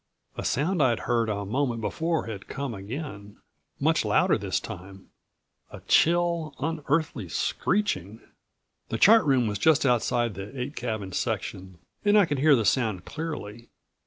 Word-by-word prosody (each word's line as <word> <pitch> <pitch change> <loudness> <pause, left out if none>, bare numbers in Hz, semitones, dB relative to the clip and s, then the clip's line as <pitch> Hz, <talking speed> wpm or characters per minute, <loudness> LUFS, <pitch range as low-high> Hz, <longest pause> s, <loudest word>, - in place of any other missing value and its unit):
A - - -5
sound 160 +5 0
I'd 120 -4 +2
heard 115 -2 0
a 100 -1 -2
moment 120 +2 -1
before 160 +8 -1
had 105 -4 -7
come 135 -2 -4
again, 105 0 -7 0.4
much - - +2
louder - - +3
this - - -1
time 95 +2 -10 0.6
a - - -10
chill, 170 -3 +2
unearthly 145 - -1
screeching. 110 - -1 0.7
The 115 - -2
chart 220 - +7
room 135 -4 +3
was 105 -2 -2
just 155 +1 +4
outside 120 -2 +1
the 100 +8 -8
eight 130 +4 -4
cabin 110 -5 -4
section 95 0 -4 0.3
and 205 0 +4
I 205 - +6
could 145 -4 -2
hear 150 +1 +6
the 115 -4 0
sound 110 -7 +1
clearly. 120 -8 -6
125 Hz, 150 wpm, -26 LUFS, 105-155 Hz, 0.7 s, chart